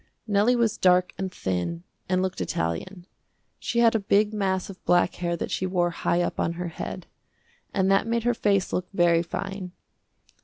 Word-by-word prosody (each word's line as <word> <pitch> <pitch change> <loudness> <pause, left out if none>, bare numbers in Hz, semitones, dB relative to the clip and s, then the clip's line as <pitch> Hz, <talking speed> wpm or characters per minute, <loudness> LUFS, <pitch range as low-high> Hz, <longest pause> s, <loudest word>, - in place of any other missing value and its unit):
Nellie 210 +3 +3
was 235 -3 +1
dark 180 0 +4
and 190 -1 -2
thin, 90 - -3 0.3
and 185 0 +2
looked 185 - -3
Italian. 90 - -3 0.5
She - - -3
had 230 -1 +5
a 225 - +2
big 205 +1 +2
mass 190 -3 0
of 195 -2 -11
black 175 0 +3
hair 170 -1 -1
that - - -4
she 185 - -1
wore 175 -2 +1
high 175 +1 0
up - - -3
on 165 - 0
her 175 0 -4
head, 160 - -6 0.7
and 190 -1 +1
that 195 +2 +3
made 230 0 0
her 240 0 +2
face 200 -4 +1
look 180 0 -1
very 175 -3 +3
fine. 185 +1 -5
185 Hz, 185 wpm, -26 LUFS, 175-200 Hz, 0.7 s, had